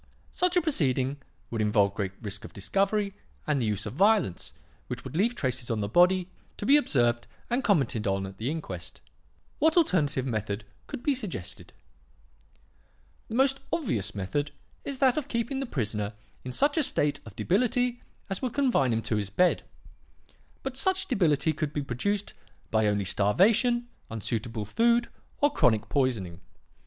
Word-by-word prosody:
Such 360 0 +1
a 355 - +3
proceeding 135 - +1 0.3
would 115 -2 -1
involve 105 -2 +3
great 95 -2 -3
risk 100 -1 -5
of - - -10
discovery 200 - 0 0.3
and 145 -3 +1
the 115 - 0
use 105 -1 -2
of - - -5
violence 195 - +2 0.4
which - - -5
would - - -8
leave 225 +8 +2
traces 130 - -2
on 115 -2 0
the 100 - -1
body, 180 - +4 0.3
to - - -5
be 275 - +6
observed 120 - +2 0.2
and 250 +3 +1
commented 135 - +2
on 95 0 0
at 95 0 -10
the 115 +4 -1
inquest. 95 - -6 0.6
What 320 +3 +3
alternative 150 - +2
method 105 -4 -2 0.2
could - - -7
be 290 - +3
suggested? 205 - -6 1.6
"The 225 - -5
most 270 +1 +3
obvious 110 - -1
method 140 +10 -2 0.3
is 280 -1 -4
that 260 0 +3
of 295 -2 -2
keeping 235 +2 -2
the 270 - -3
prisoner 105 - -2 0.3
in 130 - -5
such 285 - +2
a - - +4
state 150 - +3
of 105 -3 -12
debility 245 - +1 0.3
as 195 - -3
would 255 -3 -3
confine 250 - +2
him 115 0 -1
to 110 0 -1
his 100 -2 -2
bed. 180 - +3 1.0
But 270 -1 -4
such 380 +6 +1
debility 160 - +2
could 155 -1 -3
be 145 - -2
produced 200 - -1 0.4
by 110 -1 +3
only 105 -1 +1
starvation, 220 - +3 0.2
unsuitable 115 0 -3
food, 235 - +2 0.3
or 290 0 +4
chronic 110 - +2
poisoning. 110 - -1
145 Hz, 165 wpm, -28 LUFS, -, 1.6 s, be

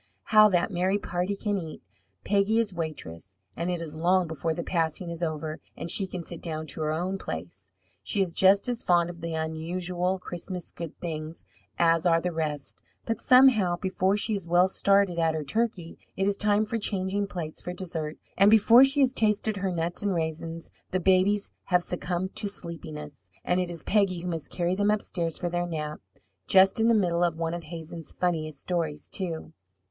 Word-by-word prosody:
How 215 0 +8
that 175 -1 +1
merry 185 +2 +1
party 180 0 -2
can 205 -1 -1
eat! 160 -3 -8 0.4
Peggy 200 +2 +2
is 225 -4 +1
waitress, 95 - -6 0.2
and 170 +2 -2
it 175 -1 -1
is 165 -2 -6
long 180 +3 +2
before 160 0 -3
the 170 - -3
passing 170 0 -1
is 170 0 -7
over, 155 -1 -3 0.2
and 170 - +1
she 195 - +4
can 180 -2 -6
sit 170 0 -7
down 155 -2 -3
in 140 - -4
her 155 -1 -2
own 180 +5 -2
place. - - -7 0.3
She 205 - -2
is 185 -3 +1
just 195 +5 +4
as 245 -2 -1
fond 175 -1 +2
of 170 -1 -13
the 165 -1 -3
unusual 175 +3 -2
Christmas 180 0 -6
good 165 -3 -8
things 160 -1 -6 0.3
as 165 0 +3
are 165 -1 +4
the 180 +1 -2
rest, 150 -3 -3 0.2
but 225 -1 -2
somehow, 250 -9 +5
before 190 +1 0
she 215 +2 +1
is 195 -4 -4
well 175 +2 +4
started 195 -2 +2
at 165 -1 +2
her 155 - -2
turkey, 185 0 -2 0.2
it 195 - +1
is 200 0 +1
time 210 +1 +2
for 225 +2 -2
changing 200 0 -1
plates 165 -5 -5
for 180 - -5
dessert, 165 -4 -5 0.2
and 195 +2 +6
before 225 +3 +7
she 275 +1 +4
has 265 -1 +3
tasted 215 -3 +1
her 195 -1 -1
nuts 170 0 -3
and 200 -2 0
raisins 165 0 -4 0.2
the 185 - 0
babies 190 +3 +2
have 180 -1 +2
succumbed 180 +1 -3
to 210 -2 0
sleepiness, 150 - -9 0.2
and 180 +1 +2
it 180 -1 -1
is 170 -2 -6
Peggy 195 -4 +2
who 180 - -5
must 165 -3 -4
carry 175 0 -1
them 205 +2 +1
upstairs 175 -6 -1
for 175 - -2
their 175 0 -1
nap 150 -2 -4 0.5
just 190 +2 +5
in 225 - +4
the 230 - +5
middle 175 -4 +2
of 170 -2 +1
one 165 0 -2
of 175 -1 -5
Hazen's 165 0 -8
funniest 155 -5 -2
stories, 160 -4 -2
too. 165 -4 -4
175 Hz, 195 wpm, -27 LUFS, 165-195 Hz, 0.5 s, How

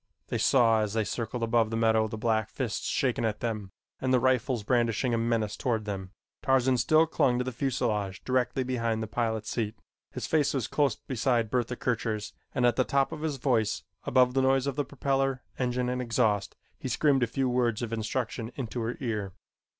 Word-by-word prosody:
They - - -1
saw 115 -4 +4
as 105 -1 -2
they 110 -1 +1
circled 115 +2 -3
above 115 -1 +2
the 115 - -2
meadow 110 -1 +3
the 110 0 -6
black 110 -2 0
fists 120 -5 -3
shaken 125 -3 0
at 110 -2 -1
them, 105 -5 -3 0.3
and 130 - 0
the 130 - +5
rifles 125 -2 +1
brandishing 120 +1 +1
a - - +2
menace 115 -2 0
toward 115 -5 -1
them. 95 -2 -4 0.3
Tarzan 130 -1 +3
still 155 +6 +4
clung 125 -6 +2
to 125 - 0
the 130 - -3
fuselage 115 -7 -1
directly 130 0 0
behind 115 -3 -1
the - - -4
pilot's 110 0 -2
seat. 110 -2 -2 0.3
His - - -5
face 150 -2 +2
was 130 -5 0
close 140 -2 +1
beside 120 -3 0
Bertha 125 -1 0
Kircher's, 110 -4 -2 0.2
and 125 - +2
at 120 -1 +3
the 130 - +4
top 135 +1 +1
of - - -6
his 155 -3 -2
voice, 120 -5 +1 0.2
above 125 -1 +3
the 135 - +2
noise 135 0 +3
of 140 -1 -2
propeller, 135 -1 0 0.2
engine 125 -1 0
and 125 0 -1
exhaust, 110 -4 +1 0.2
he - - -4
screamed 140 -3 +2
a 120 - +3
few 130 +3 -1
words 120 -2 +1
of 115 -1 -4
instruction 115 +1 -3
into 120 -2 -4
her 115 +2 -3
ear. 105 -6 -2
120 Hz, 195 wpm, -28 LUFS, 110-130 Hz, 0.3 s, the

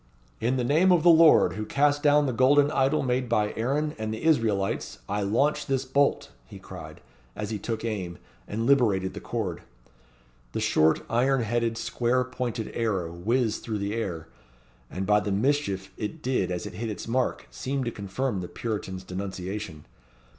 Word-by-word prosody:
"In 120 +3 +1
the 125 - 0
name 160 +9 +4
of 175 -3 +4
the 175 - +8
Lord, 160 - +6
who 110 +3 -4
cast 145 +5 +2
down 145 0 +4
the 130 - -1
golden 140 +4 +4
idol 135 +1 +2
made 125 -1 0
by 105 -2 +1
Aaron 145 +6 -1
and 110 0 -3
the 110 - -5
Israelites, 110 - +1
I 105 +1 -1
launch 120 +10 +1
this 135 -1 0
bolt," 140 +2 +1 0.2
he - - -10
cried, - - -10 0.3
as 105 0 -4
he 105 - -3
took 115 +2 -4
aim, 95 -6 -3 0.3
and 115 +2 -2
liberated 110 -9 +3
the - - -6
cord. 95 -8 -4 0.9
The - - -1
short, 80 +1 +3
iron 130 +2 +2
headed, 115 +1 0
square 125 +2 0
pointed 125 -3 -4
arrow 95 -8 -1
whizzed 110 +5 0
through 110 -2 -3
the 100 +1 -2
air, 90 -8 -3 0.6
and, 95 +1 -4
by 105 +1 +4
the 105 - -3
mischief 100 -4 0
it 135 +9 -5
did 125 -8 0
as 90 -1 -3
it - - -7
hit 110 +5 -4
its 105 - -6
mark, 125 +2 -1
seemed 135 0 -3
to 120 - -2
confirm 100 +1 -3
the 90 - -5
Puritan's 100 -5 -4
denunciation. 95 -3 -6
115 Hz, 175 wpm, -26 LUFS, 100-130 Hz, 0.9 s, the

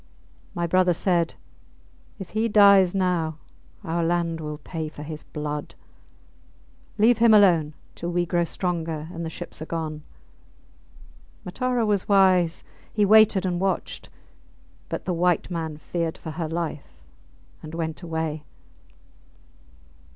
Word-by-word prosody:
My 175 - -1
brother 180 0 +3
said, 170 -2 +1 0.8
If 195 -4 -9
he 220 +2 0
dies 200 -3 +6
now 175 -5 0 0.5
our 170 -1 -1
land 170 -1 0
will 150 -1 -5
pay 160 +1 -5
for 150 -1 -10
his 155 0 -7
blood. 150 -1 -5 1.2
Leave 225 +2 +4
him 230 -1 +6
alone 170 -7 +4 0.2
till 175 - -5
we 175 0 +1
grow 175 0 +1
stronger 165 -3 -3
and 170 - -5
the 165 - -3
ships 160 - -8
are 155 - -6
gone. 155 -2 -4 1.4
Matara 250 +4 -1
was 205 -2 0
wise; 185 -4 +4 0.3
he 210 -1 +2
waited 215 -2 +5
and 175 -1 -1
watched. 195 0 -2 0.8
But - - -4
the 180 - -1
white 175 +1 +1
man 160 -3 -4
feared 165 +1 -3
for 160 - -7
her 160 0 -4
life 155 - -5 0.6
and 155 +1 -8
went 160 0 -4
away. 160 -3 -3
170 Hz, 130 wpm, -24 LUFS, 160-190 Hz, 1.4 s, dies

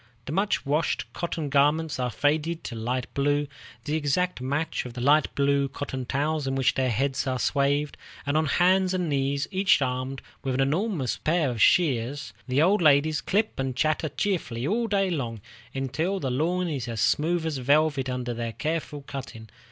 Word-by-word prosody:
The - - -5
much 195 +2 0
washed 150 +4 0
cotton 165 -3 -3
garments 150 +2 +2
are 125 -1 0
faded 155 - 0
to - - -6
a - - -6
light 125 +3 -2
blue, 145 +1 +1 0.4
the 150 - -1
exact 160 +2 0
match 145 +5 -1
of 125 - -8
the 125 - -7
light 145 +3 +4
blue 140 0 +2
cotton 130 -2 -5
towels 145 +2 -1
in 135 - -1
which 135 0 +2
their 130 -1 +1
heads 135 +4 0
are 130 -1 0
swathed, 140 +2 0 0.3
and 145 +1 -1
on 155 0 +2
hands 185 +3 +3
and 180 -3 -1
knees, 140 0 0
each 195 0 +3
armed 130 0 -2 0.2
with 130 -1 -1
an - - -1
enormous 150 - 0
pair 155 -4 +1
of 115 - -4
shears, 135 - +2
the 130 +4 +3
old 195 +4 +3
ladies 150 0 +4
clip 215 -2 0
and 135 -1 -2
chatter 155 +1 +1
cheerfully 145 - -2
all 230 +8 0
day 195 -3 +1
long, 120 -9 -3 0.4
until 155 +9 -1
the 135 -7 -2
lawn 175 +7 0
is 140 -7 -3
as 115 -2 -4
smooth 165 +8 +1
as 155 -4 -2
velvet 140 0 +2
under 125 -1 -3
their 115 -1 -4
careful 155 -1 -3
cutting. 115 -5 -8
145 Hz, 185 wpm, -26 LUFS, 130-160 Hz, 0.4 s, light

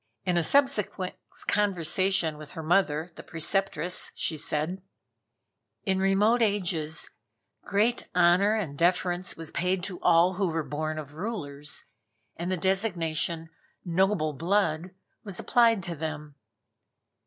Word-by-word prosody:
In 180 - +1
a 170 - +3
subsequent 210 - +2 0.3
conversation 185 -4 +1
with 150 -1 -10
her 160 - -6
mother, 165 -1 +1
the - - -10
Preceptress, 180 +2 -1
she 160 - -2
said: 155 +5 -1 1.0
"In 190 -2 0
remote 205 +5 +3
ages, 175 -7 0 0.5
great 215 +4 +1
honor 180 +4 +5
and 175 -10 -3
deference 180 +2 0
was 165 -1 -5
paid 180 +1 0
to 180 -1 -5
all 175 +1 +5
who 195 -1 +1
were 165 -1 -1
born 155 +1 -3
of 145 -2 -7
rulers, 150 -6 -4 0.5
and 175 +2 -3
the 185 - 0
designation 170 -4 0 0.3
'noble 180 -3 +1
blood,' 170 +1 0 0.3
was 200 -4 -3
applied 230 -5 +3
to 175 -3 -5
them. 150 -1 -5
175 Hz, 125 wpm, -28 LUFS, 160-195 Hz, 1.0 s, honor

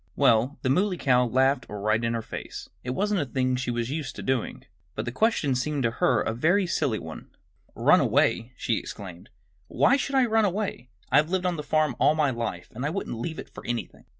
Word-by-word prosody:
Well, 130 0 +3
the 130 - +1
Muley 185 +5 +1
Cow 125 -4 +3
laughed 130 +3 +2
right 110 +2 0
in 115 0 0
her 115 - -3
face. - - -7 0.2
It 125 - -5
wasn't 205 0 +1
a - - -1
thing 130 +1 0
she 125 0 -3
was 120 +1 -2
used 145 -4 -4
to - - -7
doing. 130 -3 -2 0.3
But - - -3
the 120 - -3
question 160 - +1
seemed 135 +2 -1
to 115 - +2
her 120 -4 +3
a 110 - -1
very 175 - +2
silly 145 -9 0
one. 80 -4 -9 0.5
"Run - - +5
away!" 120 +3 +1
she 115 - 0
exclaimed. 90 -4 -9 0.4
"Why 275 - +3
should 275 0 -2
I 260 -2 +5
run 225 -1 +2
away? 200 -9 -2 0.2
I've 155 +2 +4
lived 185 0 -1
on 180 -1 +1
the 150 - -4
farm 155 -3 +1
all 155 - +4
my 150 -3 +2
life 115 -8 -4
and 120 +4 -5
I 145 - 0
wouldn't 155 - -4
leave 160 +6 -4
it - - -8
for - - -10
anything." 120 -1 -5
130 Hz, 220 wpm, -26 LUFS, 115-165 Hz, 0.5 s, Run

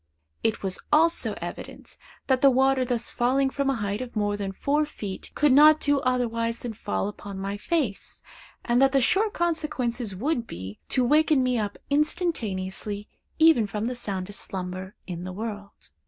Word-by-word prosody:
It 225 -1 -1
was 190 -1 -1
also 330 +3 +3
evident, - - -8 0.3
that 260 -2 +2
the 275 - +7
water 265 0 +3
thus 240 -2 -1
falling 265 +3 +1
from 280 0 0
a 270 - +1
height 205 -1 -2
of 250 -2 -7
more 205 -1 0
than 200 -1 -3
four 285 +9 +1
feet, 205 -10 -6
could 295 -1 +3
not 305 +3 +7
do 285 -2 +2
otherwise 230 -3 0
than 240 -2 -4
fall 205 -2 -2
upon 205 -1 -7
my 195 +1 -3
face, 250 - -2 0.4
and 240 +2 +3
that 270 0 +4
the 275 - +5
sure 405 - +3
consequences 260 - -2
would 240 - -1
be, 95 +4 -8
to 255 - +2
waken 300 0 +4
me 250 -2 +1
up 205 -2 -3
instantaneously, 215 - -1 0.3
even 315 -9 +5
from 210 +2 -3
the 250 +1 -2
soundest 200 -4 -3
slumber 185 0 -4
in 175 -2 -6
the 185 - -5
world. 205 -1 -7
240 Hz, 170 wpm, -26 LUFS, 205-280 Hz, 0.4 s, the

